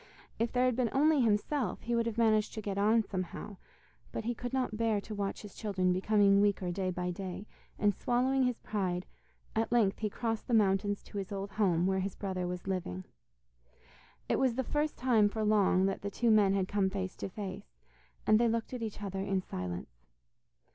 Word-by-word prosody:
If 230 Hz, +1 st, +1 dB
there 250 Hz, 0 st, +2 dB
had 250 Hz, -2 st, +2 dB
been 245 Hz, -2 st, +1 dB
only 295 Hz, +1 st, +4 dB
himself, 225 Hz, +1 st, 0 dB
he 240 Hz, -, -2 dB
would 235 Hz, 0 st, +1 dB
have 230 Hz, -1 st, -3 dB
managed 215 Hz, -2 st, +2 dB
to 220 Hz, -, -4 dB
get 200 Hz, -1 st, -2 dB
on 220 Hz, +2 st, +4 dB
somehow, 190 Hz, +1 st, -5 dB, 0.5 s
but -, -, -4 dB
he 240 Hz, -, 0 dB
could 245 Hz, +1 st, -5 dB
not 255 Hz, -5 st, -1 dB
bear 225 Hz, -1 st, +1 dB
to 215 Hz, +2 st, -8 dB
watch 200 Hz, 0 st, -3 dB
his 205 Hz, -, -10 dB
children 185 Hz, -4 st, 0 dB
becoming 200 Hz, +1 st, +4 dB
weaker 200 Hz, -3 st, +1 dB
day 185 Hz, +1 st, -1 dB
by 180 Hz, 0 st, -2 dB
day, 190 Hz, +2 st, -6 dB, 0.3 s
and 205 Hz, -1 st, +3 dB
swallowing 255 Hz, +5 st, +1 dB
his 250 Hz, -2 st, 0 dB
pride, 185 Hz, -4 st, -2 dB, 0.5 s
at 225 Hz, +1 st, 0 dB
length 220 Hz, -5 st, +3 dB
he 215 Hz, -, -1 dB
crossed 225 Hz, +1 st, -3 dB
the 240 Hz, -, +2 dB
mountains 205 Hz, -1 st, +2 dB
to 205 Hz, -, -6 dB
his 195 Hz, 0 st, -6 dB
old 195 Hz, 0 st, -4 dB
home 180 Hz, -5 st, +2 dB
where 190 Hz, 0 st, +1 dB
his 190 Hz, 0 st, -3 dB
brother 185 Hz, -3 st, -3 dB
was 180 Hz, 0 st, -5 dB
living. 175 Hz, -, -3 dB, 1.2 s
It -, -, +1 dB
was 260 Hz, -3 st, +2 dB
the 260 Hz, -, 0 dB
first 295 Hz, +4 st, -1 dB
time 230 Hz, -5 st, +4 dB
for 220 Hz, +1 st, -3 dB
long 205 Hz, -3 st, +3 dB
that 195 Hz, 0 st, -1 dB
the 200 Hz, -, -3 dB
two 230 Hz, +3 st, +1 dB
men 205 Hz, -2 st, +5 dB
had 190 Hz, -1 st, 0 dB
come 200 Hz, -1 st, +1 dB
face 190 Hz, -1 st, -4 dB
to -, -, -4 dB
face, 195 Hz, 0 st, -7 dB, 0.6 s
and 215 Hz, 0 st, +5 dB
they 235 Hz, -, +4 dB
looked 230 Hz, +2 st, -2 dB
at 250 Hz, -, -4 dB
each 215 Hz, -2 st, -5 dB
other 195 Hz, -1 st, -4 dB
in 195 Hz, 0 st, 0 dB
silence. 90 Hz, -, -6 dB
205 Hz, 205 wpm, -32 LUFS, 190-230 Hz, 1.2 s, men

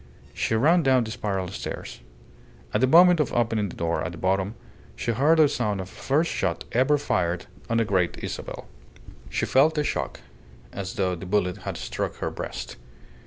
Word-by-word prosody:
She 110 Hz, -, 0 dB
ran 160 Hz, +10 st, +4 dB
down 130 Hz, -4 st, +4 dB
the 110 Hz, -, -6 dB
spiral 95 Hz, -4 st, -2 dB
stairs. 95 Hz, -, -6 dB, 0.7 s
At 105 Hz, -, +1 dB
the 130 Hz, -, +5 dB
moment 175 Hz, +4 st, +7 dB
of 150 Hz, -, +1 dB
opening 110 Hz, -4 st, +1 dB
the -, -, -9 dB
door 85 Hz, 0 st, -1 dB
at 90 Hz, -, -3 dB
the -, -, -9 dB
bottom 95 Hz, +4 st, 0 dB, 0.4 s
she 120 Hz, -, -1 dB
heard 145 Hz, +8 st, +3 dB
the 155 Hz, -2 st, +7 dB
sound 105 Hz, -7 st, -1 dB
of 95 Hz, 0 st, -5 dB
the -, -, -16 dB
first 155 Hz, +5 st, +1 dB
shot 85 Hz, -3 st, -1 dB
ever 130 Hz, +5 st, +3 dB
fired 90 Hz, -11 st, -1 dB, 0.2 s
on 115 Hz, -, +1 dB
the 115 Hz, -, +2 dB
Great 95 Hz, -4 st, +1 dB
Isabel. -, -, -6 dB, 0.6 s
She -, -, -1 dB
felt 155 Hz, +4 st, +4 dB
a 150 Hz, -, +2 dB
shock, -, -, -3 dB, 0.5 s
as 100 Hz, +3 st, -5 dB
though 95 Hz, -4 st, 0 dB
the 90 Hz, +1 st, -7 dB
bullet 90 Hz, -1 st, +1 dB
had -, -, -4 dB
struck -, -, -3 dB
her -, -, -3 dB
breast. -, -, -6 dB
110 Hz, 190 wpm, -25 LUFS, 95-140 Hz, 0.7 s, moment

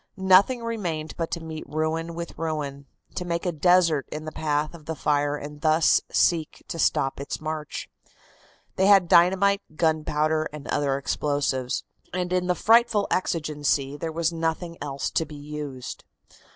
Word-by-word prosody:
Nothing 190 Hz, +6 st, +4 dB
remained 175 Hz, -9 st, -3 dB
but 165 Hz, -1 st, -3 dB
to 170 Hz, -, -4 dB
meet 160 Hz, -1 st, -6 dB
ruin 160 Hz, +2 st, -2 dB
with 170 Hz, 0 st, -6 dB
ruin, 145 Hz, -4 st, -3 dB, 0.3 s
to 180 Hz, -, -3 dB
make 170 Hz, +1 st, -2 dB
a 180 Hz, -, +1 dB
desert 165 Hz, -2 st, +3 dB
in 155 Hz, 0 st, -5 dB
the 155 Hz, -, -5 dB
path 155 Hz, 0 st, -1 dB
of 160 Hz, -3 st, -12 dB
the 160 Hz, -, -3 dB
fire 145 Hz, -1 st, +1 dB
and 145 Hz, 0 st, -8 dB
thus 155 Hz, 0 st, +4 dB
seek 165 Hz, -3 st, +1 dB
to 165 Hz, -, -4 dB
stop 135 Hz, -2 st, +1 dB
its 140 Hz, -, -4 dB
march. 155 Hz, -1 st, -5 dB, 0.9 s
They 190 Hz, -, +4 dB
had 195 Hz, -3 st, +6 dB
dynamite, 190 Hz, +4 st, +4 dB
gunpowder 155 Hz, -1 st, +1 dB
and 150 Hz, -1 st, -9 dB
other 140 Hz, -2 st, +1 dB
explosives, 140 Hz, -2 st, -1 dB, 0.3 s
and 180 Hz, 0 st, -1 dB
in 180 Hz, 0 st, +1 dB
the 180 Hz, -, +2 dB
frightful 225 Hz, 0 st, +4 dB
exigency 150 Hz, -5 st, 0 dB
there 160 Hz, +2 st, -4 dB
was 165 Hz, +1 st, 0 dB
nothing 165 Hz, +1 st, -2 dB
else 140 Hz, -1 st, -3 dB
to -, -, +1 dB
be 150 Hz, -1 st, -10 dB
used. 145 Hz, -3 st, -7 dB
160 Hz, 160 wpm, -25 LUFS, 150-175 Hz, 0.9 s, had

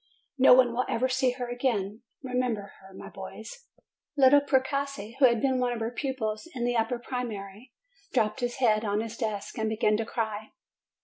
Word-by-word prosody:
No 255 Hz, -1 st, +8 dB
one 250 Hz, -2 st, +4 dB
will 250 Hz, +2 st, +1 dB
ever 255 Hz, +3 st, +1 dB
see 260 Hz, 0 st, +2 dB
her 250 Hz, -1 st, -5 dB
again. 230 Hz, -4 st, -2 dB, 0.2 s
Remember 250 Hz, -6 st, -2 dB
her, 190 Hz, 0 st, -15 dB
my 190 Hz, -, -10 dB
boys 220 Hz, -, -10 dB, 0.2 s
!" 300 Hz, -, -50 dB
Little 280 Hz, +1 st, +7 dB
Precossi, 270 Hz, -5 st, -1 dB
who 275 Hz, -, +7 dB
had 235 Hz, -2 st, +4 dB
been 260 Hz, 0 st, +1 dB
one 250 Hz, -1 st, +1 dB
of 235 Hz, -, -4 dB
her 225 Hz, +1 st, -2 dB
pupils 245 Hz, -2 st, -3 dB
in 240 Hz, -1 st, -1 dB
the 245 Hz, 0 st, 0 dB
upper 225 Hz, +2 st, +1 dB
primary, 235 Hz, -2 st, -6 dB, 0.4 s
dropped 225 Hz, +1 st, +1 dB
his 245 Hz, -1 st, -2 dB
head 220 Hz, -5 st, +2 dB
on 205 Hz, 0 st, 0 dB
his 225 Hz, 0 st, -6 dB
desk 215 Hz, -2 st, -4 dB
and 220 Hz, 0 st, 0 dB
began 215 Hz, -1 st, +2 dB
to 225 Hz, -, -2 dB
cry. 220 Hz, -2 st, -4 dB
240 Hz, 190 wpm, -28 LUFS, 215-255 Hz, 0.4 s, No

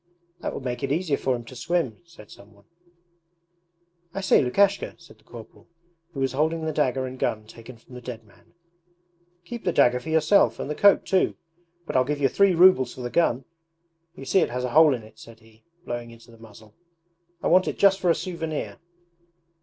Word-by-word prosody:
'That -, -, -5 dB
would -, -, -7 dB
make 125 Hz, -1 st, -4 dB
it 140 Hz, -, -3 dB
easier 160 Hz, -1 st, 0 dB
for 130 Hz, -2 st, -1 dB
him 120 Hz, -1 st, -8 dB
to 130 Hz, -, -12 dB
swim,' 135 Hz, -2 st, -2 dB
said 165 Hz, -11 st, -16 dB
some 105 Hz, +1 st, -16 dB
one. 100 Hz, -, -23 dB, 1.5 s
'I 195 Hz, -, -3 dB
say, 190 Hz, -, +4 dB
Lukashka,' 200 Hz, +10 st, +1 dB
said 170 Hz, -10 st, -18 dB
the -, -, -28 dB
corporal, 115 Hz, 0 st, -14 dB, 0.5 s
who -, -, -5 dB
was 135 Hz, -, 0 dB
holding 160 Hz, +3 st, -1 dB
the 160 Hz, -, -1 dB
dagger 130 Hz, -3 st, 0 dB
and 130 Hz, 0 st, -8 dB
gun 110 Hz, 0 st, -2 dB
taken 115 Hz, +2 st, -13 dB
from 120 Hz, +3 st, -19 dB
the 125 Hz, -, -9 dB
dead 120 Hz, -2 st, -8 dB
man. 105 Hz, +9 st, -25 dB, 0.9 s
'Keep 235 Hz, +3 st, -8 dB
the 180 Hz, -, 0 dB
dagger 125 Hz, -5 st, +3 dB
for 160 Hz, -, -9 dB
yourself 160 Hz, +5 st, +3 dB
and 150 Hz, -, -4 dB
the -, -, 0 dB
coat 200 Hz, +6 st, +4 dB
too; 190 Hz, -1 st, +1 dB, 0.5 s
but -, -, -6 dB
I'll 130 Hz, -, +4 dB
give 145 Hz, +2 st, -3 dB
you 135 Hz, -2 st, +2 dB
three 200 Hz, +2 st, +3 dB
rubles 165 Hz, -8 st, +5 dB
for -, -, -9 dB
the 120 Hz, 0 st, -5 dB
gun. 135 Hz, -6 st, +1 dB, 0.7 s
You 135 Hz, -, -10 dB
see 190 Hz, -, +2 dB
it -, -, +1 dB
has 125 Hz, +1 st, -4 dB
a 125 Hz, -, -3 dB
hole 155 Hz, -1 st, +5 dB
in 115 Hz, -, -9 dB
it,' 110 Hz, -, -17 dB
said 115 Hz, -1 st, -14 dB
he, 110 Hz, 0 st, -23 dB, 0.2 s
blowing 120 Hz, -1 st, -5 dB
into 115 Hz, 0 st, -16 dB
the 115 Hz, -, -18 dB
muzzle. 110 Hz, -1 st, -16 dB, 0.7 s
'I -, -, +1 dB
want 185 Hz, +2 st, +4 dB
it -, -, -3 dB
just 195 Hz, -1 st, +4 dB
for 180 Hz, -, 0 dB
a 165 Hz, -, +4 dB
souvenir.' 165 Hz, -4 st, -5 dB
130 Hz, 210 wpm, -24 LUFS, 120-165 Hz, 1.5 s, rubles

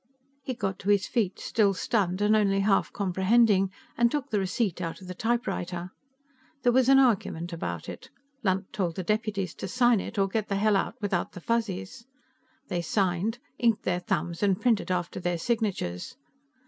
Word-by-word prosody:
He 260 Hz, -2 st, -4 dB
got 195 Hz, -4 st, -3 dB
to 195 Hz, -, -3 dB
his 200 Hz, -2 st, +4 dB
feet, 215 Hz, -7 st, -1 dB
still 205 Hz, -4 st, +2 dB
stunned 190 Hz, -2 st, 0 dB
and 210 Hz, +1 st, +4 dB
only 195 Hz, -2 st, +3 dB
half 195 Hz, -1 st, +2 dB
comprehending, 195 Hz, +1 st, +3 dB, 0.3 s
and 235 Hz, 0 st, +4 dB
took 285 Hz, 0 st, -3 dB
the 210 Hz, -, +2 dB
receipt 190 Hz, -1 st, -1 dB
out 165 Hz, -2 st, -4 dB
of 185 Hz, -, -12 dB
the 180 Hz, -, -5 dB
typewriter. 185 Hz, -5 st, -2 dB, 0.7 s
There 245 Hz, -, +5 dB
was 255 Hz, +1 st, +4 dB
an 270 Hz, -, +7 dB
argument 195 Hz, -9 st, +2 dB
about 85 Hz, -, -4 dB
it; -, -, -8 dB, 0.3 s
Lunt 190 Hz, -3 st, -1 dB
told 175 Hz, -5 st, -1 dB
the 185 Hz, -, -3 dB
deputies 210 Hz, -3 st, -1 dB
to -, -, -6 dB
sign 240 Hz, +1 st, +3 dB
it 215 Hz, -, -6 dB
or 195 Hz, -1 st, +3 dB
get 210 Hz, +2 st, -2 dB
the 200 Hz, -, -1 dB
hell 210 Hz, +1 st, +3 dB
out 195 Hz, -, 0 dB
without 195 Hz, -4 st, -1 dB
the -, -, -8 dB
Fuzzies. 230 Hz, +2 st, -3 dB, 0.6 s
They 175 Hz, -3 st, -1 dB
signed, 190 Hz, +5 st, 0 dB, 0.2 s
inked 230 Hz, -3 st, +2 dB
their 180 Hz, -1 st, 0 dB
thumbs 175 Hz, -1 st, -2 dB
and 195 Hz, -2 st, +2 dB
printed 230 Hz, -6 st, +1 dB
after 180 Hz, 0 st, -2 dB
their 175 Hz, -1 st, -1 dB
signatures. 200 Hz, -, -2 dB
200 Hz, 180 wpm, -27 LUFS, 180-225 Hz, 0.7 s, an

